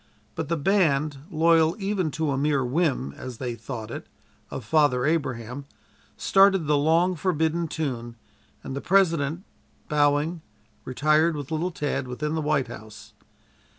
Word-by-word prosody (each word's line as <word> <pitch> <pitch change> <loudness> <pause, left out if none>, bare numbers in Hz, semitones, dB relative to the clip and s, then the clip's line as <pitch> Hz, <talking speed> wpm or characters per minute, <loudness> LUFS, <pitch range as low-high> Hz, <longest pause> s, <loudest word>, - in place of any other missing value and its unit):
But 155 +5 -4
the 170 - +1
band, 150 -5 +1
loyal 165 -1 +3
even 195 -4 -1
to 160 -3 0
a - - 0
mere 140 -1 +1
whim 130 - 0
(as 125 - -8
they 125 -1 -3
then 115 - -13
thought 115 -5 -6
it) - - -7 0.4
of - - -6
"Father 140 -1 +3
Abraham," 135 -4 -2 0.5
started 195 -3 +4
the 150 0 +2
long 165 +5 +3
forbidden 165 -1 0
tune, 125 -7 -4 0.5
and 135 - -6
the 140 - -4
President, 170 -4 +2 0.5
bowing, 150 +3 +2 0.4
retired, 155 +5 +2
with 145 0 -6
little 160 +3 0
Tad, 145 -5 -3
within 150 +5 -3
the 160 - -1
White 150 -4 +1
House. 110 -2 -11
150 Hz, 150 wpm, -25 LUFS, 135-165 Hz, 0.5 s, started